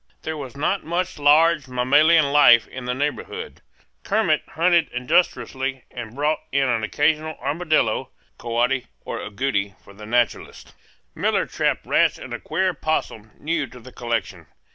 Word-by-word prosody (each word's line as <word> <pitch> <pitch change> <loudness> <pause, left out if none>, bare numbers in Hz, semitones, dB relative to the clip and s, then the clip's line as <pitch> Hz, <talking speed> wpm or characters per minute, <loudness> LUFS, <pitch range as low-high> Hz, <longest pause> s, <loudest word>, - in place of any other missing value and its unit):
There 160 - -3
was 140 -3 -8
not 185 +7 0
much 175 +1 -3
large 150 0 +4
mammalian 140 +5 +4
life 130 -6 +6
in 130 -1 -8
the 125 0 -2
neighborhood. 150 - -4 0.4
Kermit 195 -7 +1
hunted 170 -1 +3
industriously 130 -2 0
and 120 -1 -8
brought 150 +2 0
in 140 0 +2
an 120 -3 0
occasional 155 +7 0
armadillo, 145 -5 0 0.3
coati, 120 +2 0 0.2
or - - -4
agouti 100 -3 -2
for 100 - -15
the 105 +1 -11
naturalists. 120 0 -1 0.4
Miller - - 0
trapped - - -1
rats - - +2
and - - -9
a - - -4
queer 190 +1 0
opossum 150 - -3
new 155 -2 -2
to 125 +1 -13
the 130 +2 -13
collection. 110 -10 -4
140 Hz, 145 wpm, -22 LUFS, 120-155 Hz, 0.4 s, life